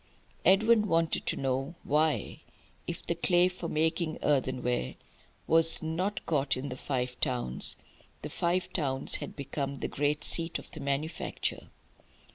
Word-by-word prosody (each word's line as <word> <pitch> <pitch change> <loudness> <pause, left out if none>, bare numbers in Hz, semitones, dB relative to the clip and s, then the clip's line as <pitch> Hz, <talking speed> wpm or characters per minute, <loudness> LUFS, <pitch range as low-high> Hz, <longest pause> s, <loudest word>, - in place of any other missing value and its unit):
Edwin 210 +3 +4
wanted 165 -2 0
to - - 0
know 135 +4 -2
why, 150 +1 0 0.5
if 170 - -5
the - - 0
clay 175 +1 +3
for 180 -2 -5
making 160 +1 0
earthenware 125 - 0 0.5
was 165 0 +7
not 180 +6 -2
got 145 -5 0
in 140 +2 -5
the 125 - -5
Five 125 -1 -3
Towns, 125 - -1 0.5
the - - -5
Five 180 +1 -1
Towns 135 -5 +2
had - - -8
become 140 0 -4
the - - -4
great 145 +1 -1
seat 165 0 +1
of - - -13
the - - -9
manufacture. 140 +4 -3
155 Hz, 140 wpm, -29 LUFS, 135-170 Hz, 0.5 s, was